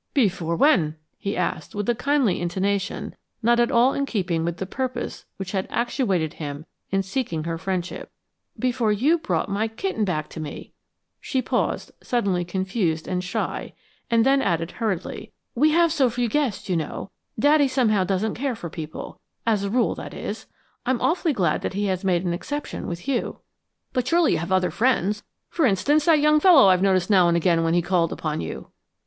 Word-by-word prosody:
"Before 185 - +1
when?" 170 - +3 0.2
he 200 - -3
asked 175 -3 -2
with 205 -1 -2
a 240 - +3
kindly 260 -5 +1
intonation 190 +3 -2 0.3
not 235 +1 +4
at 240 - +3
all 245 +3 +4
in 280 0 -1
keeping 175 -8 -1
with 170 +1 -2
the 190 - -3
purpose 255 +6 -4
which 195 -2 -5
had 190 -2 -1
actuated 195 - 0
him 145 0 -6 0.2
in 195 0 +1
seeking 190 - -2
her 165 0 -3
friendship. 185 -1 -3 0.5
"Before 245 -3 +1
you 280 +11 +3
brought 175 - -1
my 205 +3 0
kitten 225 - -2
back 155 -6 -1
to - - -8
me." 150 -2 -7 0.5
She 265 - -2
paused, - - -1
suddenly 200 -8 0
confused 185 -2 -1
and 180 -1 -1
shy, 180 - -3 0.3
then 260 +4 +4
added 165 -4 0
hurriedly, 210 -7 -4 0.2
"We 295 +6 +4
have 335 0 +3
so 270 -6 +3
few 240 +1 -1
guests, 220 -6 -1
you 185 - 0
know. 160 +4 -4 0.3
Daddy, 290 +4 +4
somehow, 235 -7 +2
doesn't 195 +3 0
care 265 0 -2
for 170 -6 -7
people 155 -1 -7 0.3
as 215 -3 +2
a 200 - -1
rule, 240 +3 +2
that - - -8
is. - - -6 0.4
I'm 255 -1 0
awfully 335 -1 +1
glad 180 - +1
that - - -3
he 205 +1 0
has 185 -1 -1
made 185 -2 +1
an 175 - 0
exception 290 +11 -5
with 170 +5 -6
you." 270 -3 -1 0.6
"But 255 -1 0
surely 335 +3 +3
you - - +1
have 170 +3 -5
other 185 -2 +2
friends 210 0 +1 0.3
for 330 - 0
instance, 285 +9 +2
that 320 -3 +5
young 300 +1 +4
fellow 300 - +7
I've 185 -1 +4
noticed 190 0 +2
now 185 -3 +6
and 170 0 +3
again 170 -1 +2
when 165 +1 +2
he 175 - +2
called 175 -2 +1
upon 155 -1 -3
you." 80 - -7
200 Hz, 190 wpm, -24 LUFS, 175-255 Hz, 0.6 s, fellow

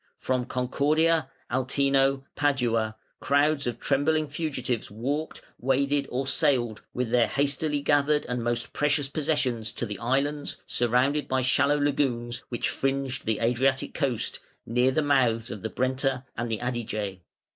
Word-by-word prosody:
From 130 -1 -1
Concordia, 145 +5 +1 0.2
Altino, 135 +1 +2
Padua, 120 -6 +1 0.2
crowds 145 0 +2
of 120 -1 -3
trembling 155 +3 +2
fugitives 145 -5 -3
walked, 140 +9 -3 0.2
waded, 140 +2 +1
or 130 +2 -2
sailed 130 -6 +1
with 125 -2 -2
their 120 -1 +4
hastily 145 +1 0
gathered 145 +1 +2
and 125 -1 -2
most 120 0 -2
precious 145 -1 +1
possessions 135 -6 -1
to - - -3
the 105 -3 -6
islands, 140 +4 -1
surrounded 125 +5 +1
by 130 0 +1
shallow 140 +3 +3
lagoons, 130 -5 0
which 120 - -1
fringed 135 -2 -2
the 110 -2 +1
Adriatic 130 +3 +1
coast, 130 -7 -1 0.3
near 125 +3 +2
the 150 +4 +1
mouths 125 -5 +2
of 105 - -6
the 110 - -3
Brenta 130 +1 -1
and 115 0 -3
Adige. 110 -4 -3
130 Hz, 135 wpm, -27 LUFS, 120-145 Hz, 0.3 s, their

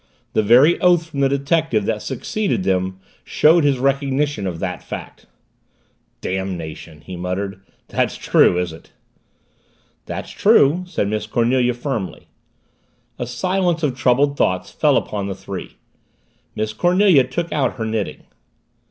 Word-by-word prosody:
The - - +3
very 125 +10 +5
oath 175 -2 +4
from 140 - -4
the 135 -1 +3
detective 140 -5 0
that 110 -1 -1
succeeded 190 - -2
them 95 - -1 0.2
showed 160 +2 +4
his 140 -2 +2
recognition 140 -3 0
of 85 -3 -4
the - - -3
fact. - - -9 0.9
"Damnation," 85 -5 -5
he 95 - -8
muttered. 95 +2 -4 0.3
"That's - - -1
true, 90 - +3
is 90 -2 -2
it?" 80 - -15 1.1
"That's - - -6
true," 160 +7 +4
said 160 - -1
Miss 105 0 -2
Cornelia 120 +2 +1
firmly. 120 -6 -5 0.9
A 120 - -3
silence 175 +6 0
of 135 -4 0
troubled 135 +2 +2
thoughts 90 -5 0
fell - - +2
upon 100 -2 -3
the 100 - -4
three. - - -8 0.8
Miss 110 0 -2
Cornelia 175 - +4
took 170 +5 -4
out 140 -5 0
her 115 -3 -4
knitting. 110 -3 -3
125 Hz, 135 wpm, -20 LUFS, 100-150 Hz, 1.1 s, very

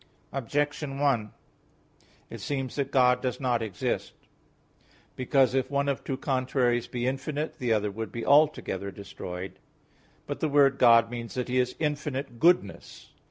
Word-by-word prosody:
Objection 145 +2 -2
1: 130 -7 +1 1.0
It - - -8
seems 135 -3 -3
that 140 -2 -1
God 125 -2 +4
does 125 -1 -2
not 125 -3 0
exist; 105 -5 -3 1.0
because 130 0 +2
if 130 -1 0
one 140 0 0
of 140 -2 -1
two 135 - -3
contraries 130 -3 0
be 120 0 -3
infinite, 140 +4 -3
the 125 -2 -1
other 105 -2 +1
would 110 0 -5
be 115 - -5
altogether 140 -10 +3
destroyed. 95 -2 -8 0.7
But - - -5
the 155 - 0
word 140 -1 +4
"God" 115 -1 +6
means 120 -1 -6
that 125 -1 -3
He 130 +1 +2
is 125 0 0
infinite 145 -5 -3
goodness. 170 - +1
130 Hz, 150 wpm, -27 LUFS, 115-140 Hz, 1.0 s, God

